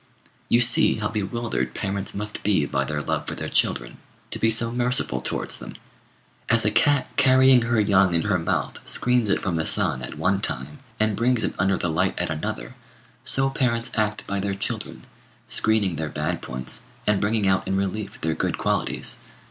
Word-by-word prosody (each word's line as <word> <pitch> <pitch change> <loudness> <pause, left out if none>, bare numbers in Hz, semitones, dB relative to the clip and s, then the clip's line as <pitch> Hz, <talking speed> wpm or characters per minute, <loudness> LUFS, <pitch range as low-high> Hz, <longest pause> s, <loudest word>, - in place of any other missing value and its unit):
You 120 - +4
see 120 0 +5
how 105 -1 -2
bewildered 105 - -3
parents 100 -1 -3
must 105 +1 -5
be 95 -8 +1
by 70 -1 -1
their 75 0 -3
love - - -3
for - - -4
their - - -5
children, - - +2 0.3
to - - -3
be 115 - +2
so 115 +1 +1
merciful 125 +1 +1
towards - - -3
them. - - -9 0.7
As 115 -1 +3
a 105 - +2
cat 140 +5 +2
carrying 130 -1 +5
her 115 0 0
young 100 -4 +3
in 80 - +1
her 100 -3 0
mouth 85 - -2
screens 125 -3 +1
it - - 0
from 90 -3 -1
the 80 - 0
sun 65 - +3
at - - -6
one 95 +1 0
time 70 - -1 0.2
and 110 -1 +2
brings 120 +1 +1
it - - -2
under 95 0 +1
the 85 - -1
light 80 - 0
at - - -1
another, 80 -1 -5 0.5
so 135 0 +3
parents 115 -3 0
act 105 -1 -1
by 100 0 -3
their 100 0 -2
children, 100 - -3 0.4
screening 105 -6 +2
their 80 -1 -3
bad 80 +4 -3
points 65 0 -3 0.2
and 105 -2 +1
bringing 105 0 0
out 95 0 +1
in 95 - -1
relief 100 +2 -4
their 80 0 -1
good 80 - -2
qualities. - - +1
100 Hz, 190 wpm, -23 LUFS, 85-115 Hz, 0.7 s, see